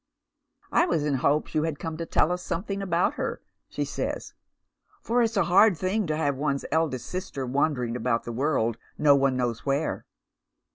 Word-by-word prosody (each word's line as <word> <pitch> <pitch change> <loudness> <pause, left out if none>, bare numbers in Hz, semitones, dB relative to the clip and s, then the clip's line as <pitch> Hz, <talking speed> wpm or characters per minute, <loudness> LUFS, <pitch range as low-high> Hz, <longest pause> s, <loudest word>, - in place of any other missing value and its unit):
" - - -38
I 350 - +4
was 155 - 0
in 150 - +1
hopes 140 +3 +1
you 155 - +2
had 160 -2 -2
come 160 +1 -5
to 165 0 -5
tell 165 - +2
us 180 0 -2
something 195 +3 -3
about 180 -2 +1
hei - - -2 0.2
," - - -53
she - - -2
says, - - -4 0.3
" - - -38
for 240 +1 +2
it's 230 -1 +1
a 195 - +4
hard 190 +4 +5
tiling 190 +4 -1
to 155 0 -1
have 145 -3 +1
one's 140 0 -1
eldest 155 -5 0
sister 180 -7 -4
wander 135 +1 +1
ing 115 0 -3
about 120 -1 0
the 120 - -5
world 120 -4 0 0.2
no 145 -2 +5
one 135 -2 +2
knows 120 -3 -1
where." 140 +3 -1
150 Hz, 205 wpm, -26 LUFS, 135-180 Hz, 0.3 s, hard